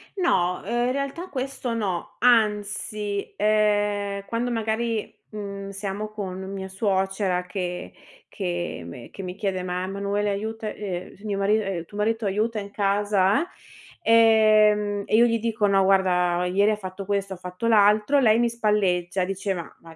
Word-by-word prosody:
No, 180 - +1
ehm, 240 +3 0
in - - +1
realtà 280 +7 -4
questo 260 -2 -3
no. 195 -7 -3
Anzi, 210 -3 +1
ehm, 205 -1 +1
quando 235 +3 -2
magari, 225 0 -1 0.2
mhmm, 200 -2 -6
siamo 200 +1 -4
con 195 -3 -5
mia 190 -1 -5
suocera 190 -2 0
che 180 -1 -5 0.4
che 175 - -4
me 115 +8 -10
che - - -8
mi 180 0 -5
chiede: 190 -3 -2
"Ma, 180 0 -2
Manuela 200 +1 -1
aiuta 220 +2 -4
ehm, 185 -4 -5
s 195 - -21
mio 205 -2 -2
mari 200 +2 +3
ehm, 195 -5 -3
tuo 205 - -11
marito 220 +1 0
aiuta 215 +3 0
in 200 0 -8
casa, 205 - +2 0.5
eh"; 220 -2 +6
ehm, 205 -1 -2
e - - +1
io 235 +2 +7
gli 230 -1 +1
dico: 220 -2 0
"No 195 -1 +4
guarda 180 -2 +2
ieri 200 +4 +3
ha - - +1
fatto 190 0 -7
questo, 200 -1 -1
ha - - -8
fatto 180 +5 -5
l'altro" 215 +5 +4
lei 225 -2 +5
mi 240 0 +3
spalleggia, 195 -5 +1
diceva: 190 -1 -2 0.2
"Vai, 165 -1 -14
205 Hz, 160 wpm, -24 LUFS, 190-220 Hz, 0.5 s, io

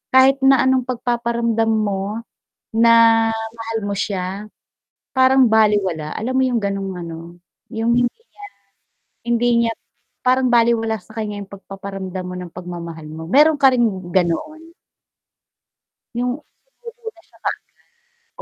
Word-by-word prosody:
kahit 265 +1 +6
na 270 0 +6
anong 260 -1 +2
pagpaparamdam 235 -2 0
mo 210 0 -1 0.5
na 230 +1 +5 0.4
mahal 225 0 -5
mo 200 - -2
siya, 195 +1 -3 0.6
parang 260 -1 +4
balewala, 205 -8 +2
alam 230 +4 -3
mo - - +4
'yong 240 -3 0
gano'ng 195 -1 -2
ano, 165 -1 -7 0.6
'yong 225 +1 +1
hindi 245 0 +3
niya 460 - -15 1.0
hindi 235 0 +1
niya 230 - +1 0.6
parang 255 0 +3
balewala 230 -2 +2
sa 220 +3 -18
kaniya 210 -2 -4
'yong 195 - -13
pagpaparamdam 195 -1 -7
mo 180 - -6
ng 180 -1 -7
pagmamahal 170 -3 -7
mo. 155 +1 -8
Mayro'n 300 +6 +6
ka 270 -1 +6
ring 245 -2 +2 0.2
ganoon. 305 - -1 1.4
'Yong 245 +1 0 2.0
hindi - - -9
225 Hz, 120 wpm, -20 LUFS, 195-245 Hz, 2.0 s, kahit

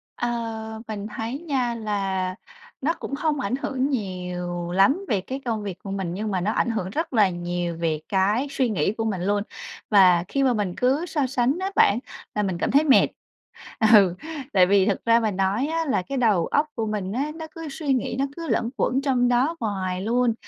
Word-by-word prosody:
Ờ, 225 -2 -3
mình 210 -1 -5
thấy 230 +5 -3
nha, 265 -7 -1
là 195 -4 -2 0.5
nó 305 +5 +1
cũng 275 - -5
không 295 0 0
ảnh 250 -2 -1
hưởng 270 -1 -1
nhiều 180 -6 -3
lắm 270 - +3
về 200 -3 +1
cái 265 +8 -5
công 225 -3 -2
việc 195 -3 -5
của 195 - -6
mình, 190 -3 -3
nhưng 210 +3 -3
mà 185 -2 0
nó 205 +4 0
ảnh 235 - +1
hưởng 215 -5 -2
rất 310 - -3
là 210 -5 +5
nhiều 175 -1 -3
về 160 -2 0
cái 205 +7 +2
suy 260 -3 0
nghĩ 190 -4 +1
của 225 - -3
mình 200 -5 -2
luôn. 205 +2 +1 0.5
Và 185 -5 +6
khi 275 - 0
mà 260 -2 +3
mình 205 -5 -1
cứ 270 +7 +2
so 295 -6 -1
sánh 255 +3 +1
á 380 +1 -2
bạn, 205 - +5 0.4
là 210 - +1
mình 190 -3 -1
cảm - - -1
thấy 285 +2 +5
mệt. 280 -3 +5 0.9
Ừ, 195 -5 +6 0.4
tại 185 -2 +6
vì 195 0 +4
thật 200 -1 0
ra 230 0 +5
mà 220 -2 0
nói 195 +7 0
á 325 +1 -1
là 270 -9 +1
cái 275 +10 -5
đầu 210 -9 +3
óc 290 - +2
của 225 - -1
mình 205 -3 -3
á, 280 +5 -1
nó 320 -1 -7
cứ 325 -1 -6
suy 280 0 -1
nghĩ, 250 -2 -1
nó 275 - +2
cứ 335 -1 -5
luẩn 230 - 0
quẩn 265 +2 +1
trong 255 -3 +2
đó 250 +7 +2
hoài 185 -4 -2
luôn 235 +3 +2
220 Hz, 215 wpm, -24 LUFS, 190-265 Hz, 0.9 s, Và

